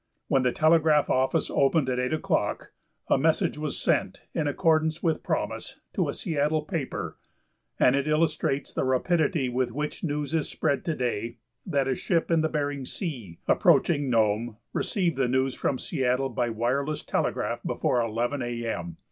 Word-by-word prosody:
When 135 - +3
the 125 -1 +2
telegraph 155 -1 +4
office 130 +4 +1
opened 140 +1 +3
at 125 -1 0
8 125 0 -1
o'clock 155 - -1 0.4
a - - +3
message 160 +2 +1
was 150 -1 -3
sent, - - 0
in 150 - 0
accordance 160 +2 +1
with 160 -3 +1
promise, - - -3
to - - 0
a - - -2
Seattle 155 -3 0
paper, 155 -5 -4 0.6
and 125 - +5
it 140 +1 0
illustrates 155 -3 0
the - - 0
rapidity 155 +3 +1
with 125 0 -1
which 150 +4 -4
news 150 -1 -2
is 160 -3 0
spread 140 - 0
to 165 -3 0
day 120 -2 -2 0.3
that 140 -6 +1
a 135 - +2
ship 170 +5 0
in 165 -1 +4
Bering 145 -3 -1
Sea, 125 - -5
approaching 145 -5 +3
Nome, 110 0 +1 0.2
received 175 -8 0
the 135 -2 +2
news 130 +1 +1
from 135 - -1
Seattle 130 -2 0
by 120 -1 -1
wireless 130 +7 -1
telegraph - - -1
before 125 - 0
11 120 +5 -1
A. 120 -1 -3
M. 85 -7 -4
140 Hz, 165 wpm, -27 LUFS, 125-155 Hz, 0.6 s, and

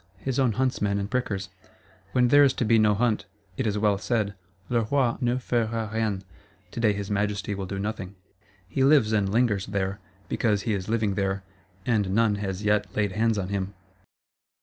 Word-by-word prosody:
His 130 +6 -2
own 125 -4 +3
huntsmen 105 -4 0
and 100 +1 -3
prickers: 100 -7 -2 0.6
when 125 -1 +3
there 145 +3 +7
is 135 -2 +4
to 125 - -1
be 115 +1 +4
no 105 -1 +4
hunt, 115 0 +1 0.3
it 125 - -1
is 105 0 0
well 105 -2 +2
said, 110 -2 0 0.3
"Le 120 -1 +1
Roi 135 -4 +2
ne 120 0 +1
fera 115 -3 -1
rien 110 -4 -1 0.5
(Today 115 -2 +2
his 100 0 -4
Majesty 105 0 -1
will 95 -1 -4
do 95 - -4
nothing)." 100 -1 -4 0.5
He 130 - 0
lives 135 -6 +5
and 100 -2 +2
lingers 105 -3 +1
there, 100 0 -2 0.3
because 105 -4 0
he 110 - 0
is 95 0 -3
living 110 -3 +1
there, 95 0 -1 0.4
and 105 -6 +1
none 115 -2 +4
has 95 0 -3
yet 105 -1 +2
laid 105 -2 +1
hands 110 +2 +1
on 95 -2 -2
him. 100 0 -3
105 Hz, 185 wpm, -26 LUFS, 100-115 Hz, 0.6 s, there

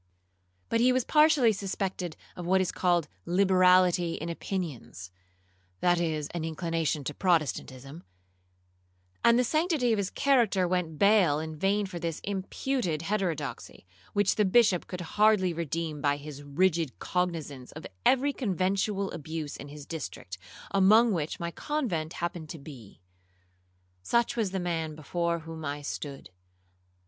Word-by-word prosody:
But 230 - +1
he 250 +2 +5
was 255 0 +2
partially 300 -7 +5
suspected 190 -3 -4 0.2
of 175 -1 -6
what 190 +1 +4
is 185 -2 0
called 175 -4 +1 0.2
liberality 180 -1 +4
in 165 - -5
opinions, 160 - -5 0.7
(that 175 -1 +3
is, 155 -3 -1
of - - -6
an 165 - -3
inclination 165 -2 -1
to 150 - -4
Protestantism), 155 -4 -1 1.2
and 235 0 +6
the 250 - +4
sanctity 305 -3 +1
of 215 - 0
his 200 -1 -1
character 230 -10 +2
went 175 -3 -1
bail 200 -7 +4
in 155 0 -5
vain 200 +5 +1
for 180 -2 -6
this 165 -2 -3
imputed 195 - -2
heterodoxy, 165 - -3 0.3
which 205 0 +2
the 210 - +4
Bishop 200 -2 +3
could 180 -1 -6
hardly 190 +1 +3
redeem 165 -2 -3
by 145 0 +2
his 145 -1 -9
rigid 160 0 0
cognizance 160 -8 -3
of 155 - -9 0.2
every 275 +2 +3
conventual 195 -2 -1
abuse 160 -2 -5
in 140 - -9
his 145 0 -10
district, 125 - -7 0.3
among 215 +4 +5
which 160 -3 -3
my 170 0 -3
convent 185 - -2
happened 170 -2 -4
to 165 - -6
be. 135 -11 -12 1.0
Such 235 - +1
was 225 -5 0
the 190 +1 -3
man 165 -3 -2
before 170 +2 -2
whom 160 0 -8
I 145 0 -4
stood. 140 -3 -6
175 Hz, 145 wpm, -28 LUFS, 155-200 Hz, 1.2 s, and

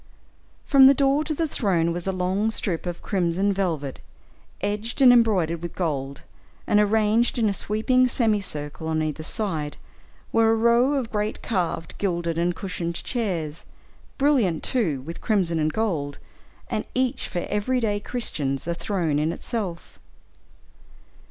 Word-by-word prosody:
From 270 -2 +7
the 275 - +6
door 280 +2 +2
to 310 0 -2
the 325 +2 0
throne 175 - +1
was 175 +2 -4
a - - +2
long 190 +4 0
strip 180 -6 -1
of 175 -1 -5
crimson 190 +1 +1
velvet, 160 -8 -2 0.6
edged 210 +4 -3
and 255 -2 +8
embroidered 185 -9 +2
with 170 -1 -6
gold, 140 -6 -3 0.4
and 210 - +3
arranged 220 +3 +2
in 225 -2 +2
a 200 - +1
sweeping 240 +6 +2
semi 225 -4 +1
circle, 150 -2 -5
on 160 -1 0
either 155 0 -3
side, 160 -5 -2 0.5
were 225 0 +4
a 225 - +4
row 235 +4 +3
of 260 -5 -2
great 210 0 -2
carved, 175 -6 -2
gilded, 170 -4 -1
and 175 +1 +1
cushioned 175 -3 -4
chairs, 170 - -3 0.5
brilliant, 255 - +2
too, 175 - 0
with 165 +5 -8
crimson 180 -7 +1
and 155 0 +1
gold, 160 -8 -2 0.5
and - - -2
each 255 -1 0
for 175 - -3
every 210 +5 0
day 210 -3 0
Christians, 150 - -3
a 170 - -1
throne 170 -5 -1
in 155 +2 +1
itself. 190 -3 -5
195 Hz, 150 wpm, -24 LUFS, 165-225 Hz, 0.6 s, and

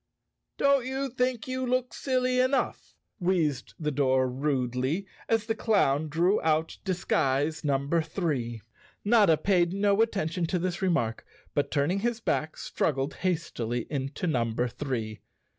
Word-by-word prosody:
"Don't 280 -2 +4
you 265 +1 -2
think 250 -1 -1
you 255 0 -2
look 255 -1 0
silly 255 -1 0
enough?" 255 +2 0 0.2
wheezed 165 -8 0
the 150 -2 -1
door 130 -2 +2
rudely, 130 +4 -1 0.2
as 225 -1 +2
the 225 - 0
clown 175 - +2
drew 175 +7 +2
out 160 0 0
disguise 155 -5 0
num¬ 140 -2 0
ber 170 +2 +2
three. 145 - -2 0.4
Notta 205 -7 +5
paid 175 +1 +2
no 200 +1 +3
attention 180 -6 0
to 180 - 0
this 180 +1 -2
remark 165 -12 0 0.3
but, 145 - 0
turning 155 +6 +1
his 235 +2 -1
back, 155 -8 -1
struggled 135 -1 -1
hastily 125 -10 -2
into 135 +3 -3
number 120 -5 0
three. 115 -5 -4
165 Hz, 140 wpm, -28 LUFS, 135-205 Hz, 0.4 s, Notta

